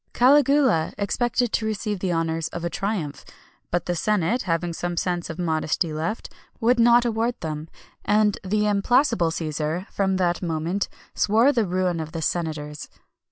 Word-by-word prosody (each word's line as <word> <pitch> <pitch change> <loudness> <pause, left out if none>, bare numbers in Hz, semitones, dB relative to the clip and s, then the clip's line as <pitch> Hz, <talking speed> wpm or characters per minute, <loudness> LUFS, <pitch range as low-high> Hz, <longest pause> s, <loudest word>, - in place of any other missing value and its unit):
Caligula 270 - +4
expected 240 +3 0
to 220 - 0
receive 210 -2 -2
the 185 -1 -1
honours 165 -1 -1
of 170 0 -6
a 170 - -2
triumph; 195 -8 -3 0.5
but 175 -1 -1
the 175 - -1
senate, 210 +5 +1
having 170 -1 -1
some 175 +1 -4
sense 175 -1 -1
of 160 - -6
modesty 160 -1 -1
left, 165 +8 -3 0.3
would 240 +1 +3
not 240 +1 +5
award 230 +1 0
them, 155 -1 -5 0.3
and 210 -1 +2
the 210 +2 0
implacable 210 - +2
Cæsar, 160 +2 -3
from 190 -1 0
that 175 -2 0
moment, 170 +3 -2 0.2
swore 225 +7 +4
the 230 -7 +1
ruin 180 -1 0
of 160 0 -6
the 165 - -3
senators. 150 -3 -3
180 Hz, 160 wpm, -24 LUFS, 165-220 Hz, 0.5 s, not